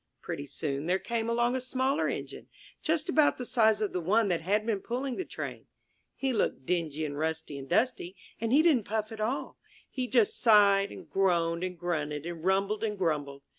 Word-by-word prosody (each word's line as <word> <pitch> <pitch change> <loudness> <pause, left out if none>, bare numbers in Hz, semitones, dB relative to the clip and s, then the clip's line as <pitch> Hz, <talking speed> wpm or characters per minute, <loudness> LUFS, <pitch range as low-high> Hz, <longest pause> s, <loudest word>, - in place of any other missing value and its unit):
Pretty 140 - -6
soon 140 +1 -3
there 185 +2 +3
came 230 +2 -2
along 240 +1 +1
a 260 - -1
smaller 260 +2 0
Engine, - - -5 0.3
just 315 0 0
about 310 -4 +3
the 250 - -5
size 220 -3 +3
of 210 - -1
the 180 - -1
one 205 +5 +2
that 175 -3 0
had 205 +5 +1
been 220 -3 0
pulling 255 +5 -3
the 375 - -3
Train. - - -7 0.5
He 265 -1 -1
looked 135 - -1
dingy 160 -3 -1
and 145 -1 -4
rusty 160 -1 -2
and 135 0 -10
dusty, 220 -7 0 0.2
and 230 0 -1
he 295 +4 +5
didn't 280 - +3
puff 215 +1 -2
at 220 -1 -6
all. 240 +6 -2 0.3
He 255 -2 -2
just 235 -4 +2
sighed, 200 -3 +5
and - - -10
groaned, 170 -3 +1
and 180 -1 -4
grunted, 150 -4 -2
and 170 -2 -6
rumbled, 195 +3 +1
and 210 -2 -1
grumbled! 145 -6 -2
200 Hz, 200 wpm, -29 LUFS, 165-235 Hz, 0.5 s, he